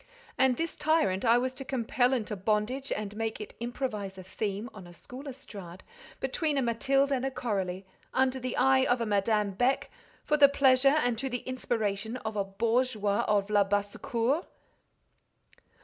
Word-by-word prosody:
And 260 Hz, -2 st, +3 dB
this 330 Hz, 0 st, -2 dB
tyrant 300 Hz, -, +1 dB
I 235 Hz, 0 st, +5 dB
was 255 Hz, +1 st, -1 dB
to 270 Hz, -, -8 dB
compel 250 Hz, -1 st, +1 dB
into 220 Hz, -5 st, -1 dB
bondage, 215 Hz, +7 st, -1 dB
and 210 Hz, -1 st, -3 dB
make 225 Hz, 0 st, -3 dB
it 210 Hz, -, -8 dB
improvise 225 Hz, -5 st, -4 dB
a 185 Hz, -, -8 dB
theme, 200 Hz, +3 st, -3 dB
on 190 Hz, -4 st, -11 dB
a 175 Hz, -, -13 dB
school 260 Hz, +9 st, -10 dB
estrade, 200 Hz, -9 st, -10 dB, 0.4 s
between 310 Hz, -4 st, -1 dB
a -, -, +3 dB
Mathilde 270 Hz, +4 st, +2 dB
and 260 Hz, -2 st, 0 dB
a 270 Hz, -, +1 dB
Coralie, 195 Hz, -8 st, -3 dB, 0.3 s
under 260 Hz, 0 st, +1 dB
the 255 Hz, -1 st, -4 dB
eye 265 Hz, +1 st, +4 dB
of 245 Hz, -1 st, +2 dB
a 230 Hz, -, -1 dB
Madame 210 Hz, 0 st, +1 dB
Beck, 245 Hz, +8 st, 0 dB, 0.3 s
for 300 Hz, -, +2 dB
the 285 Hz, -1 st, +8 dB
pleasure, 275 Hz, 0 st, +4 dB
and 245 Hz, -2 st, 0 dB
to 270 Hz, +1 st, -2 dB
the 245 Hz, -1 st, -4 dB
inspiration 225 Hz, -3 st, -2 dB
of 220 Hz, 0 st, -3 dB
a 200 Hz, -, +1 dB
bourgeois 215 Hz, +1 st, 0 dB
of 205 Hz, 0 st, +1 dB
Labassecour! 210 Hz, -, +1 dB
235 Hz, 165 wpm, -29 LUFS, 205-265 Hz, 0.4 s, the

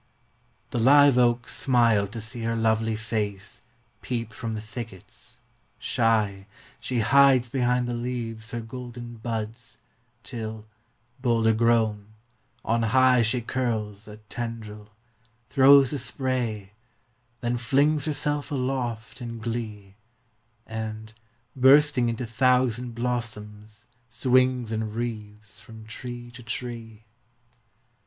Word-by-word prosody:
p> 120 Hz, -, -1 dB
<INT>The -, -, +1 dB
live 140 Hz, 0 st, +7 dB
oaks 120 Hz, -1 st, +2 dB
smile 115 Hz, -6 st, +3 dB
to 115 Hz, +4 st, -7 dB
see 110 Hz, +2 st, -5 dB
her 115 Hz, 0 st, -1 dB
lovely 110 Hz, 0 st, +1 dB
face 105 Hz, -3 st, -4 dB, 0.3 s
Peep 115 Hz, -3 st, -4 dB
from 115 Hz, 0 st, -4 dB
the -, -, -3 dB
thickets; 110 Hz, -3 st, -10 dB, 0.4 s
shy, 105 Hz, -4 st, 0 dB, 0.3 s
She 125 Hz, -3 st, -1 dB
hides 130 Hz, +1 st, +5 dB
behind 125 Hz, -1 st, +1 dB
the 120 Hz, -, -2 dB
leaves 120 Hz, -2 st, -4 dB
her 120 Hz, 0 st, -4 dB
golden 120 Hz, 0 st, -8 dB
buds 115 Hz, 0 st, -5 dB, 0.5 s
Till, 110 Hz, -3 st, -6 dB, 0.6 s
bolder 115 Hz, -3 st, +3 dB
grown, 110 Hz, -2 st, +1 dB, 0.5 s
on 115 Hz, +1 st, +1 dB
high 125 Hz, +2 st, +4 dB
She 120 Hz, +2 st, 0 dB
curls 110 Hz, -4 st, -3 dB
a 105 Hz, 0 st, -10 dB
tendril, 110 Hz, -3 st, -6 dB, 0.6 s
throws 140 Hz, 0 st, +6 dB
a 145 Hz, -, -1 dB
spray, 120 Hz, -6 st, -2 dB, 0.7 s
then 120 Hz, 0 st, 0 dB
flings 140 Hz, +5 st, +2 dB
Herself 145 Hz, -1 st, -1 dB
aloft 125 Hz, -3 st, -3 dB
in 115 Hz, -1 st, -5 dB
glee, 110 Hz, -4 st, -5 dB, 0.7 s
And, 110 Hz, 0 st, -6 dB, 0.4 s
bursting 135 Hz, -1 st, +5 dB
into 115 Hz, +2 st, -3 dB
thousand 125 Hz, +1 st, +1 dB
blossoms 110 Hz, -3 st, -4 dB, 0.2 s
swings 125 Hz, 0 st, +2 dB
In 110 Hz, -1 st, -2 dB
wreaths 105 Hz, -3 st, -6 dB
from 110 Hz, +1 st, -13 dB
tree 120 Hz, +1 st, -8 dB
to 120 Hz, +1 st, -11 dB
tree. 115 Hz, -2 st, -7 dB
115 Hz, 115 wpm, -26 LUFS, 110-125 Hz, 0.7 s, live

